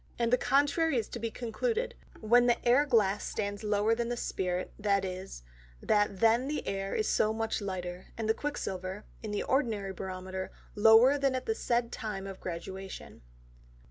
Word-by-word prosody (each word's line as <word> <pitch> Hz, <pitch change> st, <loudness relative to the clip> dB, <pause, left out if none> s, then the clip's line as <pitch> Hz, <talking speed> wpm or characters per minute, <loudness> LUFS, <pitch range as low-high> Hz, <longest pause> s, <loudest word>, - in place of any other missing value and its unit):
And 235 Hz, 0 st, +1 dB
the -, -, +7 dB
contrary 290 Hz, +2 st, +2 dB
is 225 Hz, -, -1 dB
to 240 Hz, -, -6 dB
be 230 Hz, 0 st, -2 dB
concluded, 450 Hz, -, -2 dB, 0.3 s
when 240 Hz, +3 st, +5 dB
the 240 Hz, -, +4 dB
Air 270 Hz, +5 st, +5 dB
glass 210 Hz, -5 st, +3 dB
stands 205 Hz, 0 st, -3 dB
lower 210 Hz, +1 st, +2 dB
than 235 Hz, +1 st, -1 dB
the 240 Hz, -, -2 dB
Spirit, 180 Hz, -4 st, -2 dB
viz. 190 Hz, -, -1 dB, 0.4 s
that 205 Hz, -, +1 dB
then 230 Hz, +3 st, +4 dB
the 300 Hz, +1 st, -3 dB
Air 195 Hz, 0 st, -2 dB
is 215 Hz, -, 0 dB
so 215 Hz, -, +2 dB
much 220 Hz, 0 st, -2 dB
lighter, 180 Hz, -2 st, -5 dB
and 225 Hz, -1 st, -2 dB
the 220 Hz, -, +4 dB
Quick 290 Hz, +5 st, -4 dB
silver, 185 Hz, +2 st, -4 dB, 0.2 s
in 220 Hz, -, -5 dB
the 205 Hz, -1 st, -1 dB
ordinary 220 Hz, -8 st, 0 dB
Barometer 185 Hz, 0 st, -5 dB, 0.2 s
lower 225 Hz, +6 st, +6 dB
than 275 Hz, -2 st, +2 dB
at 255 Hz, -, -3 dB
the 445 Hz, -, +1 dB
said 235 Hz, -, 0 dB
time 210 Hz, -4 st, -4 dB
of 195 Hz, -1 st, -7 dB
Graduation. 190 Hz, +2 st, -7 dB
215 Hz, 175 wpm, -30 LUFS, 195-240 Hz, 0.4 s, the